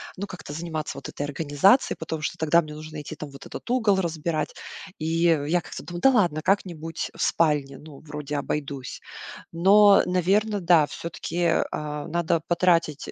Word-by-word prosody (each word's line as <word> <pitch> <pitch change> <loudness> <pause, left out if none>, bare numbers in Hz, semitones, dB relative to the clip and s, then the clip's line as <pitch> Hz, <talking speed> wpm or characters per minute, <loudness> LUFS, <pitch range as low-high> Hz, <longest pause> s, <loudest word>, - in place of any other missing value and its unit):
ну, 200 +2 -5
как-то 180 -6 -9
заниматься, 155 -3 -4
вот 140 - -7
этой - - -5
организацией, 145 - +2
потому 160 -1 -5
что - - -3
тогда 160 +2 +3
мне 155 -2 -9
нужно 155 0 -8
идти, 155 +1 -8
там, 150 -1 -8
вот 140 - -12
этот - - -9
угол 220 -6 +2
разбирать. 165 -2 -2 0.4
И, 165 +2 +1
э, 165 -3 +3
в - - -4
я 170 +4 +2
как-то - - -9
думаю: 175 0 -7
"Да 270 - +6
ладно, 175 - +2
как-нибудь 165 -4 -2
в - - -5
спальне, 145 -4 +1
ну, 150 -3 -13
вроде 150 -1 -5
обойдусь". 140 -2 -4 0.5
Но, 200 +4 +6
наверно, 195 +4 +1
да, 170 -4 +5
всё-таки, 165 +3 -7
э, 175 -1 +2
а, 150 0 -4
надо 170 0 0
потратить, 170 -4 +1
160 Hz, 180 wpm, -25 LUFS, 150-180 Hz, 0.5 s, Да